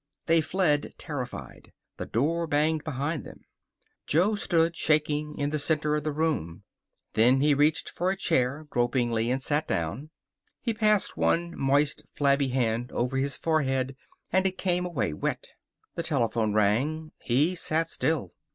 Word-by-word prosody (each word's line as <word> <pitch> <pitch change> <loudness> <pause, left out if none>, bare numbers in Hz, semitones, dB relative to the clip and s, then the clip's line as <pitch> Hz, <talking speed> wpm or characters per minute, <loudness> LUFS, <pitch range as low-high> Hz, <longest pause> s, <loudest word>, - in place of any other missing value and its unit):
They 165 0 +4
fled, 155 -3 0
terrified. 130 -5 -7 0.2
The - - -5
door 165 +8 0
banged 155 +1 +1
behind 150 +1 -3
them. - - -12 0.7
Jo 180 +8 +3
stood, 170 -5 +1
shaking, 150 -1 0
in 145 0 -1
the 155 - -1
center 150 0 +1
of 150 - -2
the 155 - -1
room. 145 - -2 0.5
Then 125 +4 +4
he 145 +1 +4
reached 150 +2 +2
for 180 +2 -1
a 190 - 0
chair, 140 -3 0
gropingly, 120 -2 +1
and 130 +1 -1
sat 150 +2 0
down. 85 - -2 0.5
He 230 - -1
passed 215 -2 +2
one 170 0 +1
moist, 140 +2 +1
flabby 140 -1 +2
hand 120 -2 -1
over 125 +2 -1
his 135 0 -1
forehead 135 -5 0 0.4
and 190 +1 +4
it 185 - -4
came 180 -1 0
away 115 - -1
wet. - - -3 0.4
The - - -3
telephone 115 -8 0
rang. 130 +10 +1
He 145 +9 +2
sat 165 -2 0
still. 155 - -1
150 Hz, 150 wpm, -27 LUFS, 130-160 Hz, 0.7 s, They